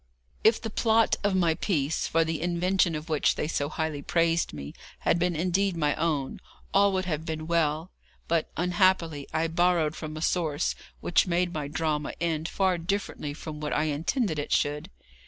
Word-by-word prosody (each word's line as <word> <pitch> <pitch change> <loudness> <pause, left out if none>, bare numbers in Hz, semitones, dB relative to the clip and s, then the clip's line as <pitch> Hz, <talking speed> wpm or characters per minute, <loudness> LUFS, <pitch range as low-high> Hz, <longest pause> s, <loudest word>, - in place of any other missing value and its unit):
If 220 +1 +5
the 225 - -5
plot 225 0 +3
of 200 -2 +2
my 170 -3 +3
piece, 160 -3 -1
for 165 0 +3
the 160 -1 -2
invention 175 0 +1
of 155 +1 -5
which 155 -3 +2
they - - -2
so 145 -3 -1
highly 155 -2 -3
praised 165 +2 +1
me, 70 -1 -7 0.3
had 170 - +2
been 175 0 +1
indeed 180 +3 +1
my 150 -2 +2
own, 150 -5 -1 0.3
all 200 0 +5
would 185 0 0
have 160 -3 -2
been 160 -1 -4
well; 165 0 0 0.4
but 165 -1 +1
unhappily 175 -4 +2
I 160 +1 +1
borrowed 165 -1 +2
from 155 -1 -6
a - - -5
source 165 -4 0 0.3
which 175 - +3
made 175 0 +1
my 150 -2 -3
drama 150 -1 -1
end 165 -2 -1
far 190 -3 +1
differently 165 -5 -3
from 155 -1 -7
what 150 0 -3
I 150 - +2
intended 155 - 0
it 145 - -4
should. 145 0 0
165 Hz, 180 wpm, -27 LUFS, 150-180 Hz, 0.4 s, If